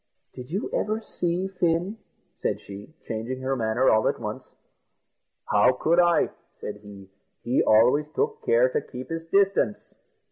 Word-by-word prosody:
"Did 125 +1 -9
you 190 +6 -2
ever 215 +1 0
see 180 -3 -2
Fin?" 180 +2 -1 0.4
said - - -1
she, 100 +10 -11
changing 115 +3 -4
her 135 +1 -1
manner 115 +2 +1
all 110 0 +4
at - - -1
once. - - -7 0.9
"How 105 +5 +4
could 165 +7 +2
I?" 175 -1 +3 0.3
said 105 - -6
he; 100 -2 -13 0.3
"he 120 +2 +2
always 125 +7 +4
took 450 +1 -1
care 485 +3 +4
to 465 -2 -1
keep 125 - -9
his 165 0 -4
distance." 195 - +1
150 Hz, 150 wpm, -25 LUFS, -, 0.9 s, all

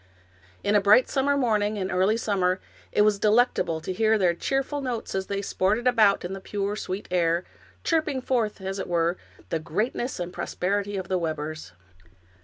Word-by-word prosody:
In 205 - +1
a 205 - +5
bright 210 +6 +6
summer 280 +1 +1
morning 215 -5 +1
in 190 -1 -2
early 190 +5 +2
summer, 190 -4 0 0.3
it 210 - +4
was 210 -1 +3
delectable 215 -7 +2
to 185 - -4
hear 220 +2 +3
their 180 -4 +3
cheerful 270 - -2
notes 245 -4 -4
as 190 0 -2
they 200 0 -2
sported 210 +6 0
about 220 -7 +4
in 180 - -4
the 195 - -6
pure, 200 +1 -2
sweet 195 -1 -5
air, 170 -1 +2 0.4
chirping 310 -5 +1
forth, 240 -5 -1
as 190 +1 -4
it - - -4
were, 170 0 +1 0.3
the 165 - -1
greatness 220 - -2
and 175 0 -4
prosperity 200 +2 -2
of 185 -2 -4
the 185 0 0
Webbers. 155 - -4
200 Hz, 180 wpm, -26 LUFS, 180-225 Hz, 0.4 s, bright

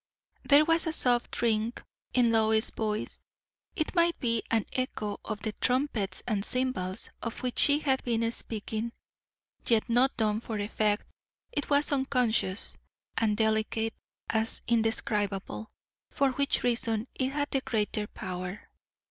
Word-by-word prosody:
There 290 +2 +6
was 330 +1 +3
a 320 - 0
soft 245 -5 +2
ring 225 0 +2 0.4
in 245 -2 +3
Lois's 220 0 +4
voice; 215 -1 -3 0.5
it 315 -4 -1
might 340 -1 +3
be 230 -3 +1
an 225 -3 +1
echo 215 -5 -2
of 215 -2 -5
the 215 - -1
trumpets 250 -6 +1
and 210 -4 0
cymbals 235 -7 -2
of 230 +1 -5
which 250 -1 -1
she 285 0 +5
had 270 -3 0
been 230 -1 0
speaking. 225 0 -2 0.7
Yet 225 -2 +4
not 250 +3 +3
done 215 -1 +1
for 225 -2 -4
effect; 210 0 0 0.5
it 290 - -2
was 285 +1 +3
unconscious, 250 -7 0 0.4
and 215 -2 +1
delicate 220 0 +1 0.3
as 220 0 0
indescribable, 220 -3 0 0.4
for 275 -2 +2
which 280 +2 +1
reason 230 -2 0
it 260 0 -1
had 290 0 -1
the 270 - +1
greater 210 -3 -1
power. 185 +1 -6
230 Hz, 140 wpm, -29 LUFS, 215-260 Hz, 0.7 s, There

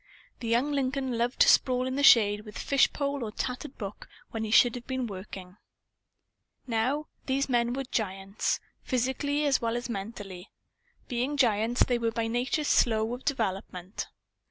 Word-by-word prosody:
The 235 - -5
young 240 +6 +2
Lincoln 265 -2 -1
loved 240 +2 -1
to - - +7
sprawl 255 -1 +4
in 260 0 -2
the 285 - 0
shade 210 -6 +6
with 210 -1 -10
fish 275 -1 +3
pole 280 -2 -2
or 215 - -4
tattered 255 +5 -5
book, 200 -2 -7 0.2
when 225 -1 -3
he 220 - -3
should 235 +2 +6
have 245 -1 -8
been 260 -2 -2
working. 190 -2 -8 1.1
Now, 255 +5 0 0.2
these 275 +1 +1
men 240 -2 +1
were 270 +1 -2
giants 195 -4 -2 0.2
physically 265 +4 0
as 280 -2 +2
well 230 0 0
as 240 0 -5
mentally. 195 -4 -6 0.6
Being 255 +4 -1
giants, 230 -1 +3
they 245 -1 0
were 230 -1 +1
by 225 0 -2
nature 245 +6 0
slow 225 -5 +2
of 250 - -7
development. 195 - -3
240 Hz, 165 wpm, -28 LUFS, 220-265 Hz, 1.1 s, to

